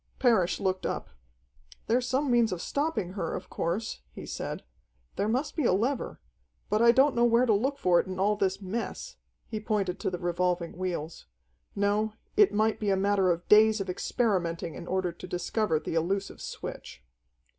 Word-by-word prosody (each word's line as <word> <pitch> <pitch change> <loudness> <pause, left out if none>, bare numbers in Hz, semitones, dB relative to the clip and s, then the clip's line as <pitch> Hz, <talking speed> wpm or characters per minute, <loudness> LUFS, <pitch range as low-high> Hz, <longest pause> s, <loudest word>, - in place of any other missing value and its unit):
Parrish 225 -9 +3
looked 185 -1 -1
up. - - -3 0.7
"There's 245 +2 +1
some 265 +1 +1
means 235 -3 +4
of 180 - -3
stopping 280 - -1
her, 170 -5 -3
of 185 - -8
course," 175 - -2
he - - -9
said. - - -5 0.5
"There 205 - 0
must 255 +7 -1
be 310 - 0
a 235 - +3
lever 240 +7 -1 0.5
but 210 +1 +3
I 235 0 +8
don't 265 +3 +4
know 235 - +2
where 240 +1 +4
to 225 - +3
look 265 +7 0
for 175 -7 +4
it - - -1
in 185 0 -5
all 205 +3 +2
this 195 -2 0
mess." 230 - -5 0.3
He 215 - -4
pointed 205 -4 -1
to - - -1
the 180 - -4
revolving 175 0 -1
wheels. 170 - -4 0.5
No, 205 +2 +1 0.2
it 415 -2 +6
might 215 +1 +1
be 210 - -1
a 195 - +3
matter 195 -1 +2
of 175 0 -1
days 215 +1 +6
of 195 -2 -2
experimenting 175 -6 -1
in 170 - -8
order 185 -1 0
to 170 +2 -10
discover 180 0 0
the - - -5
elusive 190 +5 -1
switch. - - -7
200 Hz, 185 wpm, -28 LUFS, 180-230 Hz, 0.7 s, I